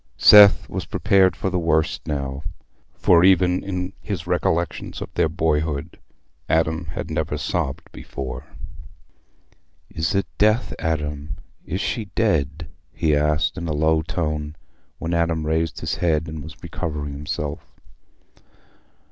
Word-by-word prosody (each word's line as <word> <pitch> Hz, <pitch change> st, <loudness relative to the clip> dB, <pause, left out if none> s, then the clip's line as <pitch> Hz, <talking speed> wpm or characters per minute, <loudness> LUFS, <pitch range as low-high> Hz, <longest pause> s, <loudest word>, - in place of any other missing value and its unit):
Seth 105 Hz, -1 st, +8 dB
was -, -, -4 dB
prepared 95 Hz, -1 st, +3 dB
for 95 Hz, -, -2 dB
the 90 Hz, -, 0 dB
worst 80 Hz, -1 st, 0 dB
now, 70 Hz, -2 st, -3 dB, 0.5 s
for, 85 Hz, -1 st, +4 dB
even 90 Hz, -1 st, +4 dB
in 90 Hz, -1 st, -4 dB
his 95 Hz, -6 st, -4 dB
recollections 85 Hz, -1 st, -1 dB
of -, -, -7 dB
their 80 Hz, -, +2 dB
boyhood, 80 Hz, -1 st, -1 dB, 0.5 s
Adam 80 Hz, +1 st, +1 dB
had 75 Hz, -, -6 dB
never -, -, -1 dB
sobbed 65 Hz, -, -2 dB
before. 65 Hz, -1 st, -7 dB, 1.4 s
"Is 80 Hz, +1 st, -1 dB
it 100 Hz, -, +2 dB
death, 110 Hz, +4 st, +3 dB
Adam? 75 Hz, -3 st, -3 dB, 0.3 s
Is 95 Hz, -, -2 dB
she 115 Hz, -, -2 dB
dead?" 80 Hz, -, 0 dB, 0.2 s
he 75 Hz, -2 st, +1 dB
asked, 75 Hz, +4 st, +1 dB
in 85 Hz, -, -4 dB
a 80 Hz, -, -1 dB
low 80 Hz, +1 st, +2 dB
tone, 75 Hz, -2 st, -3 dB, 0.4 s
when 85 Hz, +1 st, -3 dB
Adam 85 Hz, -2 st, 0 dB
raised 80 Hz, +1 st, -1 dB
his -, -, -2 dB
head 80 Hz, -2 st, +1 dB
and 80 Hz, -1 st, -6 dB
was 80 Hz, +3 st, -11 dB
recovering 75 Hz, -4 st, -4 dB
himself. 75 Hz, +1 st, -4 dB
80 Hz, 130 wpm, -22 LUFS, 75-90 Hz, 1.4 s, Seth